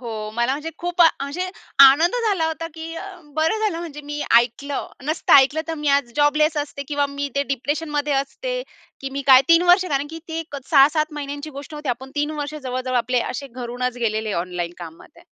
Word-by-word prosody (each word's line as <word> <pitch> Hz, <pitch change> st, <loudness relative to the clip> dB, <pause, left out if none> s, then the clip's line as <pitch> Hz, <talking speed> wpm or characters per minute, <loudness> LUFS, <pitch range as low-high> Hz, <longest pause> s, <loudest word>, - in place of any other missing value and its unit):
हो 220 Hz, -3 st, -5 dB
मला 235 Hz, +2 st, +1 dB
म्हणजे 300 Hz, +4 st, -4 dB
खूप 350 Hz, +1 st, -3 dB
म्हणजे 325 Hz, +3 st, +1 dB, 0.3 s
आनंद 285 Hz, -, +7 dB
झाला 360 Hz, -6 st, +1 dB
होता, 320 Hz, +1 st, -3 dB
की 325 Hz, 0 st, -7 dB
अ, 330 Hz, -, -6 dB, 0.3 s
बरं 320 Hz, +8 st, +1 dB
झालं 425 Hz, -6 st, -1 dB
म्हणजे 320 Hz, -4 st, -7 dB
मी 295 Hz, 0 st, -5 dB, 0.2 s
ऐकलं. 270 Hz, +4 st, -2 dB, 0.2 s
नसतं 310 Hz, +3 st, 0 dB
ऐकलं 280 Hz, +3 st, +5 dB
तर 325 Hz, -, -2 dB
मी 300 Hz, -1 st, -2 dB
आज 240 Hz, -4 st, -3 dB
जॉबलेस 300 Hz, +1 st, +3 dB
असते 290 Hz, -1 st, -3 dB
किंवा 290 Hz, -1 st, +1 dB
मी 280 Hz, 0 st, -5 dB
इथे 280 Hz, 0 st, -1 dB
डिप्रेशनमध्ये 290 Hz, +2 st, -2 dB
असते. -, -, -2 dB, 0.4 s
की 270 Hz, 0 st, -5 dB
मी 280 Hz, +1 st, -4 dB
काय 260 Hz, -1 st, +8 dB
3 335 Hz, +1 st, +6 dB
वर्ष 365 Hz, +1 st, +6 dB
कारण 280 Hz, -2 st, -1 dB
की 325 Hz, -, -7 dB
ती 325 Hz, 0 st, -4 dB
एक 310 Hz, -3 st, -8 dB
6-7 305 Hz, +2 st, +4 dB
महिन्यांची 290 Hz, +1 st, -6 dB
गोष्ट 285 Hz, +2 st, -9 dB
होती. 295 Hz, -1 st, -6 dB
आपण 260 Hz, +2 st, -3 dB
3 295 Hz, +1 st, 0 dB
वर्ष 290 Hz, +1 st, -4 dB
जवळ-जवळ 255 Hz, -3 st, -3 dB
आपले 250 Hz, +1 st, +1 dB
असे 275 Hz, +3 st, -5 dB
घरूनच 250 Hz, 0 st, -4 dB
गेलेले 220 Hz, -2 st, -1 dB
ऑनलाईन 175 Hz, -1 st, -4 dB
कामामध्ये. 175 Hz, -, -12 dB
285 Hz, 195 wpm, -22 LUFS, 260-320 Hz, 0.4 s, काय